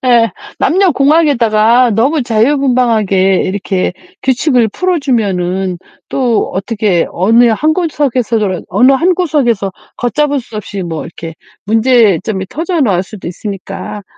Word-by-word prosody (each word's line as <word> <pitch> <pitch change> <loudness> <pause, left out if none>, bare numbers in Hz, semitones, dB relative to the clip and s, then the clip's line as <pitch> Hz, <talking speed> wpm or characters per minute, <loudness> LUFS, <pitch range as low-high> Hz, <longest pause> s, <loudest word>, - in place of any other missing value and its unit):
예 230 -3 +4 0.3
남녀공학에다가 275 - +3
너무 265 +7 +1
자유분방하게 225 -6 +1
이렇게 190 -1 -2 0.3
규칙을 255 -2 +2
풀어 365 - -1
주면은 190 - -1 0.3
또 245 -4 0
어떻게 200 -2 0
어느 225 +7 +3
한 305 +8 +1
구석에서라 240 - -1
어느 255 +2 +4
한 345 +7 +2
구석에서 245 - 0 0.2
걷잡을 285 +3 0
수 230 -2 -11
없이 200 -1 -5
뭐 165 -3 -4
이렇게 165 -1 -9 0.3
문제점이 220 -4 +2
터져 330 +4 -2
나올 195 -9 +2
수도 195 -1 -9
있으니까 200 +2 -7
230 Hz, 295 characters per minute, -13 LUFS, 195-275 Hz, 0.3 s, 예